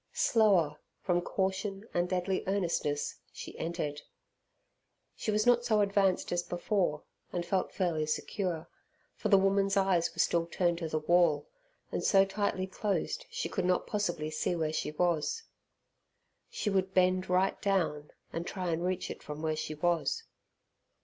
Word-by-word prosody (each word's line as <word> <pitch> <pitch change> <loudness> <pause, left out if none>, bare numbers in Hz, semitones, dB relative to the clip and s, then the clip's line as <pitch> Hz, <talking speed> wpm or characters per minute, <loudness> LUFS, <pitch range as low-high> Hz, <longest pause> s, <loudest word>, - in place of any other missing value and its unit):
Slower, 200 -9 +3 0.2
from 175 -2 +2
caution 195 +3 -2
and 175 0 +1
deadly 185 +1 0
earnestness, 170 -7 -1
she - - -9
entered. 155 -3 -3 1.1
She - - -4
was 215 0 +2
not 240 -1 +5
so 220 -3 +2
advanced 200 -2 +2
as 175 0 +1
before, 175 -3 -1 0.3
and 175 -1 -2
felt 190 +1 0
fairly 165 -5 0
secure, 170 +1 -2 0.5
for - - -3
the 200 - +7
woman's 195 0 +2
eyes 190 -3 +2
were - - -21
still 170 -1 +2
turned 175 0 0
to 165 -2 -3
the 155 - 0
wall, 170 0 +3 0.4
and - - -2
so 195 -1 +5
tightly 195 -1 -1
closed 195 +2 -2
she 465 +1 -3
could 190 - -2
not 180 0 +2
possibly 175 -7 -2
see 155 +3 0
where 160 -2 -1
she - - -1
was. 170 - 0 1.1
She 210 - -2
would 190 -1 0
bend 185 0 +3
right 185 +1 +2
down, 165 -7 0 0.2
and 170 +1 -3
try 185 -3 -2
and 165 +1 -1
reach 185 0 -1
it - - -8
from 150 +1 -7
where 155 -1 0
she 155 0 -4
was. 175 - 0
180 Hz, 155 wpm, -31 LUFS, 165-195 Hz, 1.1 s, the